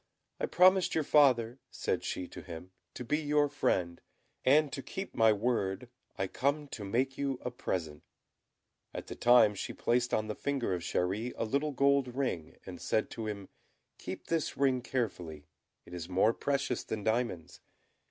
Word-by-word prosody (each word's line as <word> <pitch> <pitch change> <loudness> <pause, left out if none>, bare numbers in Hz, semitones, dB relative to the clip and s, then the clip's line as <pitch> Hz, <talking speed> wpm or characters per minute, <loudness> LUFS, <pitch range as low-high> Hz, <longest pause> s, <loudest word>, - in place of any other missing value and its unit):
"I - - 0
promised 185 +1 +5
your 160 - +2
father," 130 -5 +4
said - - -2
she 90 - -3
to - - -9
him, 90 +1 -9 0.2
"to 125 - -6
be 150 +6 +1
your 150 -1 +2
friend; 90 -11 -1 0.4
and, 145 +2 +4
to 135 - -3
keep 190 +8 -6
my 110 -1 +5
word, 105 0 -1 0.3
I 95 - 0
come 145 +8 -1
to 105 - -6
make 130 +7 -1
you 140 -2 -1
a 125 - -1
present." 80 -10 -3 0.9
At - - -5
the - - -7
same - - -16
time 120 -3 +6
she 100 - -5
placed 120 +1 +1
on 110 - +1
the 105 - -3
finger 135 -6 -1
of 90 - -2
Chéri 95 +7 -1
a - - -1
little 140 +6 0
gold 140 -2 +2
ring, 110 - -2
and - - -8
said 110 - 0
to 115 -2 -5
him, 100 -2 -5 0.5
"Keep - - -6
this 165 -2 -1
ring 130 -2 +2
carefully 90 - -3 0.4
it 85 - -13
is 85 0 -6
more 95 +5 +3
precious 140 -3 -1
than 110 -2 -4
diamonds. 105 -7 -1
120 Hz, 175 wpm, -31 LUFS, 95-140 Hz, 0.9 s, time